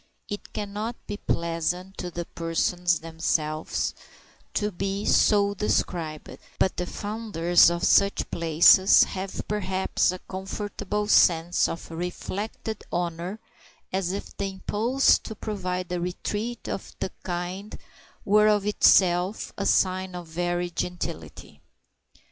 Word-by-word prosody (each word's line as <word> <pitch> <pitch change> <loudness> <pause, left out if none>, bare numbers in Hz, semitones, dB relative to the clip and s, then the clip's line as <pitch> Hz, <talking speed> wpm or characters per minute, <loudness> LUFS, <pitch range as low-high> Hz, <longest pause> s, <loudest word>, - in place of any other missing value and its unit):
It 205 - -7
cannot 210 +3 -4
be 205 - -5
pleasant 170 +2 -2
to 180 - -3
the 170 0 -5
persons 170 +1 0
themselves 160 -1 -1 0.6
to 210 0 0
be 195 +2 -3
so 200 -1 +4
described, 170 -6 -2 0.2
but 190 - +1
the 180 - -3
founders 205 -6 +2
of 170 0 -3
such 200 0 +3
places 170 +4 +6
have 190 0 -5
perhaps 190 -3 0
a 185 - -5
comfortable 205 +2 -4
sense 175 -4 +4
of 165 - -7
reflected 195 +5 -5
honor, 175 +3 -3 0.6
as 185 -2 0
if 200 - -6
the 200 -1 -2
impulse 225 +7 +2
to 220 - -8
provide 185 -4 -4
a 175 -1 -1
retreat 210 +6 -4
of - - -5
the 190 - -3
kind 180 +3 -5 0.5
were 210 +1 +5
of 210 -1 +3
itself 185 -1 +3
a 200 - -2
sign 185 0 +1
of 175 -1 -6
"very 175 +1 -2
gentility." 80 - -5
185 Hz, 120 wpm, -26 LUFS, 175-205 Hz, 0.6 s, places